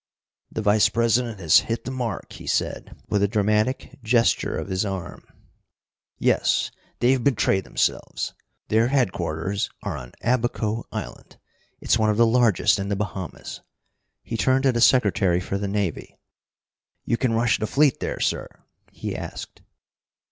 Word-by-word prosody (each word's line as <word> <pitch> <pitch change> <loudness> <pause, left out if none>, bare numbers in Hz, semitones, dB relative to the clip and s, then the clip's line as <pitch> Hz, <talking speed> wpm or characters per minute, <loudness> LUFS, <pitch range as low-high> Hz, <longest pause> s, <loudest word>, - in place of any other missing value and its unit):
"The 110 - -3
Vice 105 +1 +4
president 115 -1 +1
has 85 -4 +6
hit 115 - -2
the 130 - -4
mark," 125 -5 -4
he - - -11
said, - - -2
with 105 - +1
a 100 - +4
dramatic 110 +4 0
gesture 115 0 +2
of - - -4
his 95 0 -1
arm. 95 -4 -5 0.9
"Yes, - - +2 0.3
they've 125 0 +3
betrayed 105 -8 +2
themselves. - - -1 0.4
Their 110 +2 +3
headquarters 95 - -1
are - - -3
on 65 -2 -10
Abaco 115 -1 0
Island. - - -7 0.4
It's 120 - +2
one 110 -1 +3
of 105 - +1
the 115 - +6
largest 115 -4 +3
in 100 0 -3
the 100 - 0
Bahamas." 95 -3 -5 0.6
He 115 - -5
turned 130 +3 +2
to 135 - +4
the 120 -1 -1
Secretary 100 -8 +4
for 95 +2 -3
the 100 - -2
Navy. 100 -4 -3 0.9
"You - - +1
can 120 -1 0
rush 115 0 +2
the 110 - -1
fleet 145 +1 +3
there, - - -3
sir?" - - -1 0.4
he - - -5
asked. - - -7
110 Hz, 150 wpm, -24 LUFS, 100-120 Hz, 0.9 s, has